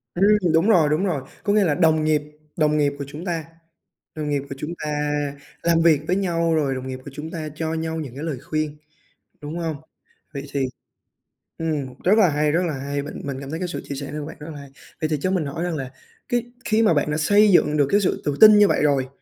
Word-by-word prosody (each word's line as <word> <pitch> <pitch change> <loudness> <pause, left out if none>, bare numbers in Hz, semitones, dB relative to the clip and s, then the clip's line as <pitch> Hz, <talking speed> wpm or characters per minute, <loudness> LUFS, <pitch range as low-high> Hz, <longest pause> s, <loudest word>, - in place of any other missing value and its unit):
Ừm, 195 -2 +3
đúng 165 +7 +3
rồi, 165 -8 +5
đúng 155 +6 +1
rồi, 165 -8 -1 0.2
có 205 - +1
nghĩa 210 -1 +4
là 155 -6 +2
đồng 160 -3 +3
nghiệp 155 -1 +2 0.4
đồng 150 -1 +2
nghiệp 145 -1 +2
của 140 - -4
chúng 150 +5 -8
ta 165 -4 -2 0.7
đồng 155 -1 -3
nghiệp 145 -1 0
của 135 - -5
chúng 155 +4 -4
ta 150 - -2 0.7
làm 165 -1 +3
việc 160 -3 +4
với 180 - +2
nhau, 170 -4 +1
rồi 140 -4 +1
đồng 130 0 -5
nghiệp 130 0 -5
của 145 - -8
chúng 155 +3 -7
ta 155 -2 -5
cho 160 0 -2
nhau 160 0 -3
những 135 -6 -6
cái 145 - -6
lời 155 -6 -3
khuyên, 155 0 -3 0.6
đúng 150 +3 -5
hông? 165 -2 -2 0.6
Vậy 140 -1 -5
thì, 140 -2 +1 0.9
ừm, 150 -6 -2
rất 205 +5 +5
là 200 -5 +6
hay, 150 0 +1
rất 170 +3 +2
là 160 - -2
hay! 140 +1 -3
Mình 145 - -7
mình 140 -2 -4
cảm 140 0 -7
thấy 160 - -3
cái 180 0 -3
sự 175 - -4
chia 140 - -5
sẻ 140 0 -6
này 150 - -4
của 145 - -5
bạn 160 - -9
rất 150 +2 -8
là 150 - -9
hay! 140 -1 -12 0.3
Vậy 155 - 0
thì 155 - +2
cho 185 - 0
mình 180 -5 0
hỏi 150 +5 -3
rằng 175 -2 -2
là 135 -3 -5 0.4
cái 240 0 -1
khi 220 0 +2
mà 210 -7 +4
bạn 145 0 +1
đã 150 - 0
xây 205 +7 +5
dựng 150 -4 +4
được 145 -2 +3
cái 205 - +4
sự 195 - 0
tự 145 -1 -1
tin 215 -1 +9
như 205 -1 +6
vậy - - +1
rồi, 140 -3 +2
155 Hz, 260 wpm, -23 LUFS, 145-175 Hz, 0.9 s, tin